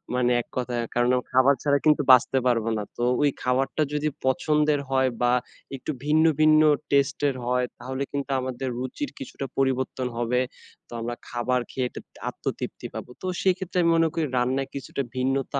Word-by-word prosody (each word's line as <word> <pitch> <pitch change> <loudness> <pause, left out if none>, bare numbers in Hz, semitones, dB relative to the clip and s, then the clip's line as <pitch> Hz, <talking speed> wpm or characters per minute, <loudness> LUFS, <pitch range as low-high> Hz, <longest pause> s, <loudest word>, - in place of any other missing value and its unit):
মানে 125 -1 +2
এক - - -15
কথায় 120 -1 -1
কারণ 120 +1 +3 0.2
খাবার 130 +2 +5
ছাড়া 145 -1 +3
কিন্তু 150 -1 +5
বাঁচতে 130 +1 +6
পারবো 115 -2 +2
না। 105 - -2
তো 120 - -1 0.2
ওই 145 - +4
খাবারটা 135 +4 +1
যদি 150 +1 0 0.2
পছন্দের 150 +2 +2
হয় 130 -1 +2
বা 120 0 +3 0.4
একটু 135 +3 -4
ভিন্ন, 155 +2 +4 0.2
ভিন্ন 155 0 +6 0.3
টেস্টের 140 0 +2
হয় 125 0 +1
তাহলে 130 +2 -4
কিন্তু 140 0 -3
আমাদের 130 0 -3
রুচির 130 - -4
কিছুটা 255 - -6
পরিবর্তন 130 -1 0
হবে। 120 +1 +1 0.5
তো - - -26
আমরা 120 +1 -3
খাবার 125 +1 0
খেয়ে 130 -1 -1
এত - - -15 0.3
আত্মতৃপ্তি - - -5
পাবো। - - -7
তো - - -7 0.2
সেক্ষেত্রে 185 -1 0
আমি 170 - +3
মনে 165 0 +4
করি 165 -2 0
রান্নায় 130 +2 0
কিছুটা 140 0 -4
ভিন্নতা 135 +2 0
130 Hz, 170 wpm, -25 LUFS, 125-145 Hz, 0.5 s, বাঁচতে